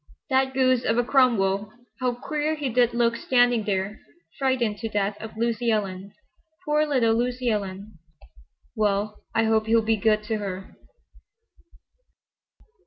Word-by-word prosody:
"That 265 Hz, 0 st, +2 dB
goose 255 Hz, -2 st, +3 dB
of 225 Hz, -, +1 dB
a 245 Hz, -, +3 dB
Cromwell! 215 Hz, -6 st, +2 dB, 0.3 s
How 250 Hz, -2 st, 0 dB
queer 300 Hz, +4 st, -2 dB
he 290 Hz, -3 st, -3 dB
did 240 Hz, 0 st, +2 dB
look 235 Hz, -1 st, +2 dB
standing 245 Hz, -2 st, +2 dB
there, 195 Hz, +1 st, -2 dB, 0.4 s
frightened 250 Hz, -6 st, 0 dB
to 225 Hz, +1 st, -4 dB
death 205 Hz, -1 st, -1 dB
of 220 Hz, 0 st, -9 dB
Lucy 235 Hz, +1 st, 0 dB
Ellen. 200 Hz, -3 st, -2 dB, 0.5 s
Poor 300 Hz, 0 st, +2 dB
little 245 Hz, -6 st, +2 dB
Lucy 245 Hz, +1 st, 0 dB
Ellen! 200 Hz, -2 st, -5 dB, 0.8 s
Well, 210 Hz, 0 st, -1 dB
I 225 Hz, -, +3 dB
hope 220 Hz, 0 st, +1 dB
he'll 225 Hz, 0 st, +3 dB
be 225 Hz, 0 st, +2 dB
good 215 Hz, 0 st, +2 dB
to 220 Hz, 0 st, -2 dB
her." 195 Hz, -2 st, -6 dB
225 Hz, 140 wpm, -25 LUFS, 210-250 Hz, 0.8 s, goose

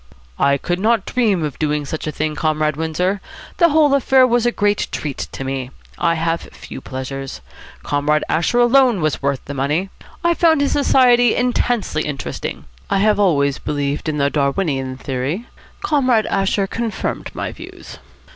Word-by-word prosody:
"I 140 Hz, 0 st, +3 dB
could 175 Hz, +5 st, -2 dB
not 220 Hz, 0 st, +2 dB
dream 210 Hz, -9 st, +1 dB
of 150 Hz, -3 st, -4 dB
doing 150 Hz, -1 st, 0 dB
such 155 Hz, +2 st, -5 dB
a -, -, -1 dB
thing, 155 Hz, +1 st, -2 dB
Comrade 155 Hz, -1 st, 0 dB
Windsor. 180 Hz, +5 st, -1 dB, 0.4 s
The 340 Hz, -, +5 dB
whole 300 Hz, -2 st, +4 dB
affair 265 Hz, -1 st, +5 dB
was 240 Hz, -1 st, +2 dB
a -, -, +2 dB
great 205 Hz, -2 st, 0 dB
treat 145 Hz, -3 st, -4 dB
to -, -, -6 dB
me. 135 Hz, -1 st, -3 dB, 0.3 s
I 170 Hz, -1 st, +2 dB
have 165 Hz, +1 st, -1 dB
few -, -, -10 dB
pleasures. 135 Hz, +1 st, -6 dB, 0.4 s
Comrade 145 Hz, +1 st, +1 dB
Asher 165 Hz, +9 st, +1 dB
alone 245 Hz, -4 st, +4 dB
was 155 Hz, -2 st, 0 dB
worth 140 Hz, -1 st, -1 dB
the 145 Hz, -, -6 dB
money. 150 Hz, +8 st, -1 dB, 0.3 s
I 340 Hz, 0 st, +3 dB
found 330 Hz, -2 st, +3 dB
his 285 Hz, -, +1 dB
society 245 Hz, -4 st, +4 dB
intensely 245 Hz, -8 st, 0 dB
interesting. 145 Hz, -3 st, -5 dB, 0.2 s
I -, -, +2 dB
have 210 Hz, +1 st, +3 dB
always 140 Hz, -8 st, +2 dB
believed 145 Hz, +1 st, -2 dB
in 150 Hz, -, -2 dB
the 140 Hz, 0 st, +1 dB
Darwinian 140 Hz, -3 st, -1 dB
theory. 135 Hz, -, -3 dB, 0.4 s
Comrade 255 Hz, -, +2 dB
Asher 195 Hz, 0 st, 0 dB
confirmed 225 Hz, +1 st, -3 dB
my -, -, -3 dB
views." -, -, -11 dB
165 Hz, 165 wpm, -19 LUFS, 145-235 Hz, 0.4 s, The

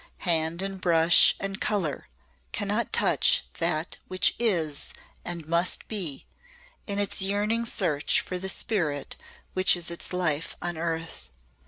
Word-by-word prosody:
Hand 165 Hz, +1 st, +1 dB
and 195 Hz, -1 st, -5 dB
brush 165 Hz, -1 st, +5 dB
and 195 Hz, +1 st, -4 dB
colour 180 Hz, -9 st, -1 dB, 0.4 s
cannot -, -, -1 dB
touch -, -, +3 dB, 0.2 s
That 165 Hz, -1 st, 0 dB
which 185 Hz, +1 st, +3 dB
Is 165 Hz, -11 st, 0 dB, 0.3 s
and 170 Hz, -3 st, -5 dB
Must 170 Hz, +2 st, 0 dB
Be 175 Hz, -11 st, -3 dB, 0.6 s
in 200 Hz, -1 st, -1 dB
its 205 Hz, -1 st, 0 dB
yearning 210 Hz, +4 st, 0 dB
search 160 Hz, -9 st, +1 dB
for 180 Hz, -, -4 dB
the 190 Hz, +1 st, -2 dB
spirit 160 Hz, -10 st, -2 dB, 0.4 s
which 185 Hz, -1 st, +4 dB
is 170 Hz, 0 st, -5 dB
its 170 Hz, -, -3 dB
life 165 Hz, -4 st, -1 dB
on 175 Hz, 0 st, -2 dB
earth. 165 Hz, -, -5 dB
175 Hz, 135 wpm, -26 LUFS, 160-195 Hz, 0.6 s, brush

